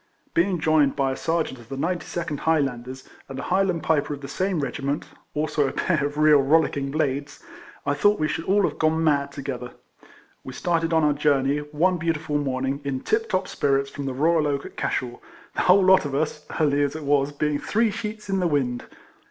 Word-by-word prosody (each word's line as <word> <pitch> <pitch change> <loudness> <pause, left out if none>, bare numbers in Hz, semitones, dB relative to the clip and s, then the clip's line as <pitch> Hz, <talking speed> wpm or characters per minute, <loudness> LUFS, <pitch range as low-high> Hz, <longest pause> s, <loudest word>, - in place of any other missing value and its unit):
Being 175 +1 +2
joined 155 -3 +3
by 135 -1 +1
a - - -3
Serjeant 165 -5 -2
of 115 -1 -15
the 135 - -5
92nd 170 -1 -3
Highlanders, 130 -5 -1 0.2
and 135 - -7
a 140 - -4
Highland 185 -2 +1
Piper 150 -2 +1
of 140 - -14
the 140 - -7
same 185 +4 -1
regiment 140 +1 -2 0.3
(also 150 -1 +1
a - - -2
pair 155 +1 0
of 145 0 -9
real 150 -1 +6
rollicking 140 -1 +2
blades), 140 -1 -2 0.5
I 145 - +1
thought 205 +9 +3
we 155 - +1
should 160 - -3
all 200 +2 +3
have - - -1
gone 160 +1 +2
mad 140 -3 +2
together. 130 -3 -6 0.7
"VVe 130 - -8
started 165 -1 0
on 160 -1 +3
our 150 -1 +4
journey, 145 -1 +2
one 150 +5 0
beautiful 155 -2 -1
morning, 135 0 -2
in 135 -2 -3
tip 445 +1 0
top 185 0 0
spirits, 140 -1 0
from 140 -1 -5
the 135 - -2
Royal 155 +2 +2
Oak, 140 -1 -2
at - - -10
Cashel; 120 -1 -3 0.3
the - - -1
whole 190 +2 +5
lot 190 0 +6
of 140 -2 -3
us 150 +1 -2
(early 145 -2 +2
as 145 0 0
it 160 - -6
was) 140 0 +2
being 145 0 -1
three 225 0 +1
sheets 215 +1 -6
in 195 -1 0
the 180 - +2
wind. 130 -6 -1
150 Hz, 205 wpm, -24 LUFS, 140-165 Hz, 0.7 s, real